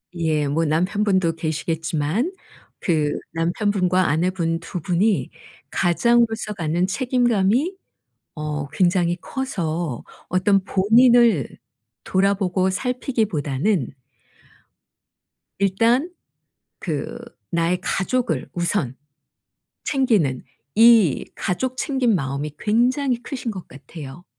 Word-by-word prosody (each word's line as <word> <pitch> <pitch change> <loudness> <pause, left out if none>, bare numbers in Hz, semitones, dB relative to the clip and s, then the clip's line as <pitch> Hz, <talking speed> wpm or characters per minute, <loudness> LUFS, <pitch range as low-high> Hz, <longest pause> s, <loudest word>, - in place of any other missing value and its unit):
예. 155 -3 0
뭐 160 +4 0
남편분도 185 +2 +1
계시겠지만 160 - -1 0.5
그 155 -4 +1 0.2
남편분과 185 +2 +1
아내분 165 +1 0
2 170 +1 -6
분이 180 - +1 0.4
가장으로서 225 +3 +2
갖는 170 0 0
책임감이 245 - +1 0.6
어 150 -2 -4
굉장히 175 +2 +1
커서 170 - -3 0.2
어떤 190 +2 +2
본인을 225 - +4 0.6
돌아보고 190 -1 +1
살피기보다는 200 - -1 1.7
일단 230 - +2 0.7
그 150 -5 -4 0.3
나의 170 +1 +1
가족을 240 +7 -1
우선 175 -7 -1 0.9
챙기는 215 - +1 0.3
이 225 - +5
가족 255 +8 -2
챙김 265 -6 +1
마음이 140 -2 -2
굉장히 245 +3 +1
크신 255 -2 -5
것 190 -4 -8
같아요. 140 +3 -11
185 Hz, 205 characters per minute, -22 LUFS, 160-230 Hz, 1.7 s, 이